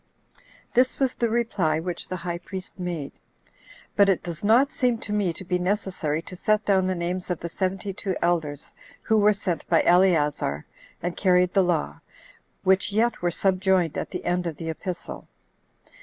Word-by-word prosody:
7. - - -29 0.3
This 255 +1 +2
was 265 -2 +2
the 235 - 0
reply 205 -9 +1
which 175 +1 -5
the 185 - -4
high 170 -1 -4
priest 185 +1 -9
made. 170 -6 -4 0.8
But 200 -1 +5
it 190 - +1
does 170 0 -6
not 240 +7 +4
seem 245 -3 +1
to 210 - -5
me 205 -4 +1
to 175 - -8
be 180 0 0
necessary 180 -5 -1
to 185 - -9
set 215 +3 +1
down 190 -2 +3
the 185 - 0
names 180 +2 -3
of 180 - -1
the 170 - -5
seventy 190 +3 -2
[two] 190 0 -3
elders 160 -4 -1 0.3
who 220 - +2
were 210 +1 +5
sent 185 -5 -3
by 165 - +4
Eleazar, 155 - +2 0.4
and 175 0 -2
carried 180 -2 +3
the 195 - +5
law, 75 - -1 0.6
which 190 +2 +3
yet 225 +3 +1
were 175 - +2
subjoined 185 -2 +1
at - - -3
the 180 - -6
end 180 0 0
of 160 -3 -5
the 165 -1 -3
epistle. 180 +2 -6
185 Hz, 185 wpm, -25 LUFS, 170-200 Hz, 0.8 s, But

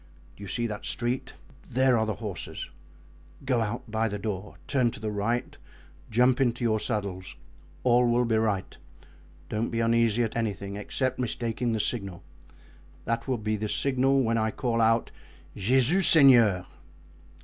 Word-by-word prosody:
"Do - - -16
you - - -7
see 120 +4 -2
that 105 -2 -5
street? 120 +2 -2 0.3
There 130 0 +3
are 110 -1 +1
the 110 - -2
horses. 105 -6 -6 0.7
Go 125 -3 +1
out 115 +1 -4
by 110 +1 +1
the 105 -1 -3
door, 100 -1 -5
turn 130 -4 +2
to - - -9
the 110 0 -3
right, 110 +4 -2 0.5
jump 125 +4 +3
into 120 -2 +1
your 110 -2 +2
saddles, 100 -5 -4 0.5
all 125 -1 +4
will 120 +1 +2
be 115 -1 +1
right; 105 -4 -1 0.7
don't 110 +2 -2
be 115 - -2
uneasy 115 0 +2
at 110 - -3
anything 100 -3 -3
except 130 +6 -2
mistaking 120 -1 -2
the 110 - -1
signal. 100 -6 -2 0.8
That 115 +2 -2
will 130 -2 0
be 110 0 -2
the 105 +1 -3
signal 135 +1 +2
when 115 -1 +1
I 110 0 +1
call 115 0 -1
out—Jesus 120 - 0
Seigneur!" 120 - +6
115 Hz, 155 wpm, -27 LUFS, 105-125 Hz, 0.8 s, Seigneur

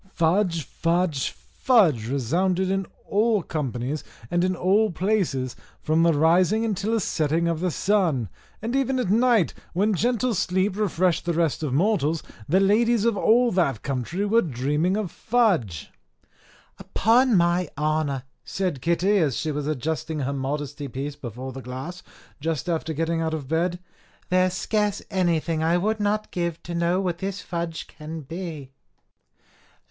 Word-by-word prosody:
Fudge, 170 -1 +1
fudge, 165 -1 0
fudge, 115 - +2
resounded 180 +9 +1
in 195 -2 -1 0.2
all 215 -1 +2
companies 135 -2 -3 0.3
and 175 0 +2
in 185 0 +1
all 200 +5 +3
places, 170 - 0 0.2
from 160 +1 +1
the 170 0 +5
rising 180 +8 +3
until 210 0 -1
the 225 - +2
setting 160 -2 0
of 165 -2 0
the 180 +1 0
sun; 170 - +1 0.4
and 235 +3 -2
even 270 -1 +1
at 245 -7 0
night, 230 -4 +3 0.2
when 205 +5 +2
gentle 240 +5 +1
sleep 185 +1 0
refreshed 185 -4 +1
the 170 - 0
rest 165 -3 +1
of 150 -4 -2
mortals, 165 0 +1 0.3
the 185 +5 +4
ladies 220 +3 +3
of 230 -2 +2
all 235 +4 +4
that 140 - 0
country 140 - -2
were 225 +3 +4
dreaming 150 - 0
of 205 -6 -3
fudge! 180 - 0 0.9
"Upon 235 +1 +3
my 175 -1 +2
honour," 150 -3 0 0.2
said 180 -9 -2
Kitty, 180 +6 +2
as 150 -7 +1
she 155 - -1
was 145 0 -3
adjusting 155 +2 -2
her 140 +1 -1
modesty 140 +1 -3
piece 140 +3 -5
before 130 -1 -7
the 135 - -7
glass, 130 +9 -7 0.4
just 160 +1 -2
after 165 -2 -1
getting 165 +2 -1
out 160 -1 -1
of 145 -4 -6
bed, 170 +4 0 0.5
"there 185 0 +4
is 180 - -3
scarce 210 0 0
anything 170 -4 +1
I 165 +2 +3
would 215 +4 0
not 210 +1 -1
give 170 -2 -3
to 175 - -6
know 170 +2 +1
what 180 -3 -2
this 195 +1 -3
fudge 170 -2 -4
can 155 +1 -8
be." 155 -3 -7
170 Hz, 155 wpm, -24 LUFS, 150-195 Hz, 0.9 s, the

